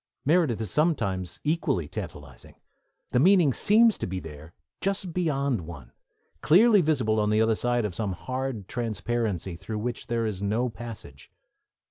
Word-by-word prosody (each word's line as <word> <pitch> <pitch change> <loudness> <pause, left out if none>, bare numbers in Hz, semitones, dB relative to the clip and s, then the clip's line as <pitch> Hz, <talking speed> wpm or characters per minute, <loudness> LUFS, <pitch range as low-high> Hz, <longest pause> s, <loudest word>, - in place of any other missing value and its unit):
Meredith 150 -7 +2
is 110 -5 -4
sometimes 95 - 0
equally 145 - 0
tantalising. 70 -4 -9 0.6
The 125 - +2
meaning 175 -3 +5
seems 225 - +4
to - - -3
be 95 0 -4
there, 80 -1 -11 0.3
just 195 -3 -2
beyond 140 - 0
one, 70 -8 -10 0.5
clearly 205 +5 +6
visible 130 -9 +1
on 105 0 +1
the 105 0 +2
other 110 0 +3
side 120 +1 0
of 100 - -3
some 100 -1 -2
hard 130 -1 -4
transparency 110 -5 -2
through 105 +6 -6
which 120 +3 -4
there 115 -1 -1
is 100 -3 -4
no 110 +5 0
passage. 110 - -10
115 Hz, 150 wpm, -26 LUFS, 95-150 Hz, 0.6 s, clearly